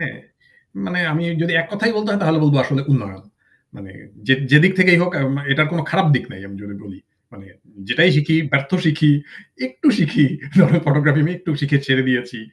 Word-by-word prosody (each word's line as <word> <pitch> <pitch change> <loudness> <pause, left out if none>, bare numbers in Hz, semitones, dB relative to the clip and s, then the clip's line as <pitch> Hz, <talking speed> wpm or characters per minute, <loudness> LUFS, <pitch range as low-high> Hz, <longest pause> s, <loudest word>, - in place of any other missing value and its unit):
হ্যাঁ - - -6 0.7
মানে 180 - -4
আমি 160 +3 -2 0.2
যদি 170 +1 -2
এক 165 - -5
কথায়ই 220 +2 -1
বলতে 210 +1 -3
হয় 205 0 -1
তাহলে 160 -2 +1
বলবো 145 -1 +3
আসলে 135 +1 -2
উন্নয়ন। 100 -7 -3 0.5
মানে 95 -1 -14 0.4
যে 135 - +6 0.2
যেদিক 155 +6 +5
থেকেই 180 -2 +5
হোক 180 - -1 0.4
এটার 155 +2 +1
কোনো 170 -2 -2
খারাপ 190 - +1
দিক 125 - -2
নাই 95 - -13
আমি 100 - -12
যদি 100 0 -11
বলি। 100 -2 -13 0.3
মানে 100 -1 -17 0.4
যেটাই 175 +3 +3
শিখি, 155 +2 +1 0.2
ব্যর্থ 140 0 0
শিখি, 155 -1 +2 0.6
একটু 130 - -7
শিখি 150 -3 +2 0.3
যেমন 185 -2 +5
আমি 170 - +4
ফটোগ্রাফি 150 +1 +2
আমি 165 - -1
একটু 180 -2 -7
শিখে 140 -1 +1
ছেড়ে 130 0 +2
দিয়েছি। 125 -1 -3
150 Hz, 190 wpm, -18 LUFS, 130-175 Hz, 0.7 s, যে